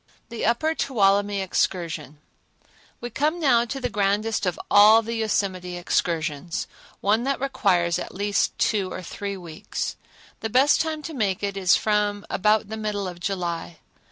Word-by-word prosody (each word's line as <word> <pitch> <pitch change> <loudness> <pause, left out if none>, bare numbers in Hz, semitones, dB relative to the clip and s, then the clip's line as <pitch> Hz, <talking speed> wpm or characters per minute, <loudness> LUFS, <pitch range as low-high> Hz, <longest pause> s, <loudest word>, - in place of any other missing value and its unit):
The 235 -1 -4
Upper 310 +8 +1
Tuolumne 205 -7 +2
Excursion 170 -6 -2 0.8
We 240 - -5
come 305 +8 0
now 245 -7 +4
to 255 +3 -5
the 250 - -1
grandest 210 -1 0
of 180 - -2
all 215 +2 +7
the 230 +1 -4
Yosemite 190 -5 -1
excursions, 170 -2 -1 0.4
one 210 +3 +2
that 275 0 0
requires 185 -10 +1
at - - -6
least 205 0 0
two 200 -4 0
or - - -6
three 200 +3 -5
weeks. 165 -4 -5 0.4
The 220 - -3
best 265 +6 +4
time 315 -1 -3
to 325 - -6
make 205 -8 -1
it 200 -1 -2
is 185 -2 +4
from 210 -1 0
about 210 +2 +2
the 220 - -5
middle 210 -2 -2
of 175 -1 -7
July. 175 - -3
205 Hz, 155 wpm, -24 LUFS, 185-225 Hz, 0.8 s, all